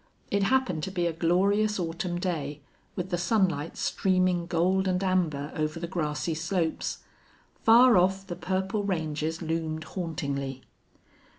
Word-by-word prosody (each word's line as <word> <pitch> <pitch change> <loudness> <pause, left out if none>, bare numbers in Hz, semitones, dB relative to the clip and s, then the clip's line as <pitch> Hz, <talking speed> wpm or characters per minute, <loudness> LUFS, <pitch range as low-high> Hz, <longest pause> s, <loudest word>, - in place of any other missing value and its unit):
It 200 - +2
happened 195 -7 +1
to 190 - -5
be 175 -2 -1
a 170 - 0
glorious 200 +6 +2
autumn 175 0 -2
day, 150 -5 -3 0.3
with 185 0 -4
the 175 - 0
sunlight 175 -5 +1
streaming 185 -2 +1
gold 185 +3 +2
and 185 +1 0
amber 160 -6 0
over 155 +1 -2
the 170 - -3
grassy 165 -2 -2
slopes. 165 +1 -2 0.6
Far 235 +2 +7
off 190 +2 +2
the 175 - -5
purple 190 +4 -1
ranges 160 -3 -2
loomed 160 -1 -2
hauntingly. 140 -7 -4
175 Hz, 135 wpm, -28 LUFS, 160-190 Hz, 0.6 s, Far